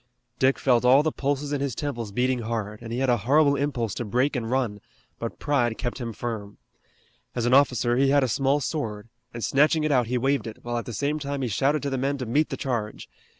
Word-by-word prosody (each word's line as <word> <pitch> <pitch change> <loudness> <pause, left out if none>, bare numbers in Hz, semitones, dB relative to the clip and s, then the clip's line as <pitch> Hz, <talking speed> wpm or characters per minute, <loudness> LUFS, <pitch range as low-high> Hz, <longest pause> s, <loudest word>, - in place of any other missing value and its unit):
Dick 130 +1 +3
felt 125 -3 +2
all 130 +4 +6
the 155 - +1
pulses 145 +1 -2
in 140 - -1
his 140 -5 -2
temples 120 -7 -4
beating 125 +3 +1
hard, 110 -2 -4
and 115 -1 -8
he 120 - -2
had 135 0 +1
a 120 - +3
horrible 140 +7 +3
impulse 125 -8 -1
to - - -3
break 125 +7 0
and 115 -3 -2
run, 120 -6 -1 0.4
but 115 - -5
pride 125 -6 0
kept 120 +2 -4
him 120 -2 -4
firm. 110 -2 -5 0.8
As 120 -2 -1
an 120 - +2
officer, 125 -3 +4
he 135 +1 +3
had 140 0 +4
a - - +2
small 135 +4 +1
sword, 115 -7 -4 0.2
and 115 -1 -6
snatching 150 +6 +3
it 155 - +1
out 125 -4 +3
he 125 +2 0
waved 135 +1 0
it, 110 - -7
while 120 0 -2
at 115 - -7
the - - -4
same 145 +5 -1
time 140 -1 -3
he - - 0
shouted 140 +8 +1
to 140 - -2
the 135 - -1
men 140 +2 0
to 130 - -4
meet 145 +7 +1
the - - -4
charge. 120 -7 -3
125 Hz, 240 wpm, -25 LUFS, 115-140 Hz, 0.8 s, all